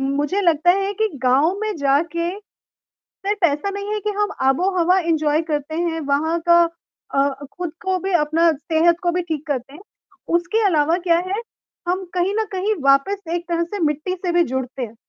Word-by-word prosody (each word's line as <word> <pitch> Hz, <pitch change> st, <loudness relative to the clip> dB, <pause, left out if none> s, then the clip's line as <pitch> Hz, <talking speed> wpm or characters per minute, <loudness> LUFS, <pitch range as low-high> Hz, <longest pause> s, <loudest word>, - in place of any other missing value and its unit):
मुझे 295 Hz, +8 st, 0 dB
लगता 340 Hz, 0 st, +4 dB
है 390 Hz, +1 st, 0 dB
कि 440 Hz, -, +4 dB, 0.2 s
गाँव 275 Hz, +8 st, +3 dB
में 430 Hz, -1 st, -2 dB
जाके, 310 Hz, +5 st, +1 dB, 0.8 s
सिर्फ 405 Hz, 0 st, -4 dB
ऐसा 300 Hz, +7 st, -1 dB
नहीं 400 Hz, +1 st, -4 dB
है 425 Hz, -, -2 dB
कि 420 Hz, +1 st, -2 dB
हम 415 Hz, -1 st, +2 dB, 0.2 s
आबोहवा 360 Hz, +4 st, +2 dB
एन्जॉय 315 Hz, -2 st, +1 dB
करते 295 Hz, +1 st, -2 dB
हैं, 330 Hz, -1 st, -1 dB
वहाँ 305 Hz, +3 st, 0 dB
का 340 Hz, 0 st, +7 dB, 0.5 s
अ, 275 Hz, +1 st, +3 dB, 0.3 s
खुद 350 Hz, -3 st, -3 dB
को 375 Hz, -1 st, +1 dB
भी 390 Hz, -, -1 dB
अपना 330 Hz, +2 st, +3 dB
सेहत 325 Hz, +3 st, +2 dB
को 350 Hz, -, +2 dB
भी -, -, 0 dB
ठीक 315 Hz, -3 st, -5 dB
करते 270 Hz, -2 st, -3 dB
हैं, 335 Hz, -, -12 dB, 0.6 s
उसके 430 Hz, +6 st, 0 dB
अलावा 320 Hz, -2 st, +3 dB
क्या 335 Hz, 0 st, +5 dB
है, 400 Hz, +4 st, -1 dB, 0.5 s
हम 370 Hz, +1 st, 0 dB
कहीं 365 Hz, +3 st, +1 dB
न -, -, +1 dB
कहीं 395 Hz, +3 st, 0 dB
वापस 275 Hz, +9 st, +3 dB
एक 345 Hz, 0 st, -4 dB
तरह 340 Hz, 0 st, 0 dB
से -, -, -2 dB
मिट्टी 305 Hz, +5 st, -1 dB
से 360 Hz, -1 st, -2 dB
भी 345 Hz, 0 st, +4 dB
जुड़ते 260 Hz, 0 st, -3 dB
हैं। 230 Hz, -2 st, -5 dB
340 Hz, 185 wpm, -21 LUFS, 295-375 Hz, 0.8 s, का